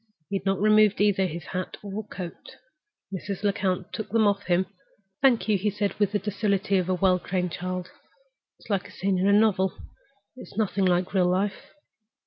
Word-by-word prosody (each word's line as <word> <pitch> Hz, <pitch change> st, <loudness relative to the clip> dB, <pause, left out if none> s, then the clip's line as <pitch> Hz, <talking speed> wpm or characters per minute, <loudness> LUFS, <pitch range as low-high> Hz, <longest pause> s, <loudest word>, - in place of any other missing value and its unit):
He 200 Hz, -, +1 dB
had 195 Hz, -, -6 dB
not 195 Hz, 0 st, +1 dB
removed 215 Hz, 0 st, +4 dB
either 195 Hz, -2 st, +3 dB
his 170 Hz, 0 st, -6 dB
hat 185 Hz, -1 st, -5 dB
or 205 Hz, +2 st, -5 dB
coat. 180 Hz, -4 st, -8 dB, 0.6 s
Mrs. 195 Hz, +1 st, -5 dB
Lecount 190 Hz, -3 st, -1 dB
took 220 Hz, -, -4 dB
them 225 Hz, 0 st, +3 dB
off 200 Hz, -1 st, +3 dB
for -, -, -17 dB
him. 180 Hz, +1 st, +3 dB, 0.6 s
"Thank 260 Hz, -5 st, +4 dB
you," 210 Hz, -3 st, +2 dB
he 210 Hz, +3 st, +1 dB
said, 205 Hz, 0 st, -1 dB
with 205 Hz, -2 st, +2 dB
the 210 Hz, -, +1 dB
docility 200 Hz, -1 st, 0 dB
of 180 Hz, 0 st, -2 dB
a 185 Hz, -, +2 dB
well 185 Hz, 0 st, +3 dB
trained 180 Hz, -1 st, -2 dB
child. 180 Hz, +1 st, -4 dB, 0.7 s
"It's -, -, -17 dB
like 200 Hz, -3 st, -1 dB
a -, -, -14 dB
scene 190 Hz, -1 st, -1 dB
in 190 Hz, -, +2 dB
a -, -, +5 dB
novel—it's 205 Hz, +4 st, -1 dB
like -, -, -16 dB
nothing 200 Hz, -3 st, +1 dB
in 180 Hz, 0 st, +2 dB
real 185 Hz, -2 st, +3 dB
life." 190 Hz, +2 st, -2 dB
195 Hz, 195 wpm, -26 LUFS, 185-205 Hz, 0.7 s, a